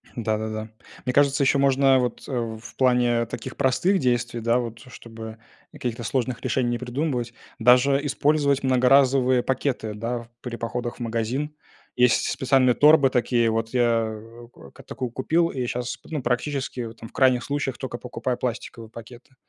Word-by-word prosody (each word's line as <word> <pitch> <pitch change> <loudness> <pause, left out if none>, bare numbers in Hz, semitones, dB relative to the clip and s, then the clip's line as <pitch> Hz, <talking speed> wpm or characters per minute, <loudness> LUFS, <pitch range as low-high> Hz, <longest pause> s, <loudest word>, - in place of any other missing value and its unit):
Да, 110 -2 -1
да, 110 0 -4
да. 110 0 -5 0.4
Мне 125 - -1
кажется, 140 0 +3
ещё 135 +1 +3
можно, 135 -1 +4
вот, 125 -2 -2
э, - - -7 0.3
в 115 - -12
плане 125 -2 +2
таких 115 +3 -7
простых 175 +8 +2
действий, 120 -2 0
да, 115 +2 +2
вот, 115 -1 -5
чтобы 110 -2 -10 0.3
каких-то 120 -1 -5
сложных 120 +1 -2
решений 125 -2 0
не 120 - -1
придумывать, 125 -1 -3 0.2
даже 125 +4 +4
использовать 145 -1 +1
многоразовые 130 0 +4
пакеты, 130 -5 -2
да, 120 +3 -3
в 115 - -20
при 120 -2 -5
походах 120 +1 -4
в - - -19
магазин. 120 +6 -2 0.4
Есть 125 -1 +3
специальные 130 -1 +3
торбы 150 +1 +6
такие 120 -1 +2
вот. 115 0 -1
Я 115 -3 +1 0.5
как - - -15
такую 130 -3 -5
купил 165 +7 +1
и 130 -2 -3
щас, 125 0 -3
п - - -19
ну, 150 -4 -2
практически, 130 0 -2
вот 115 -1 -7
там, 115 - -10
в - - -26
крайних 130 -2 +3
случаях, 140 -2 -2
тока 130 -3 -5
покупаю 125 0 -4
пластиковые 115 -2 -5
пакеты. 120 +3 -13
125 Hz, 170 wpm, -24 LUFS, 115-135 Hz, 0.5 s, торбы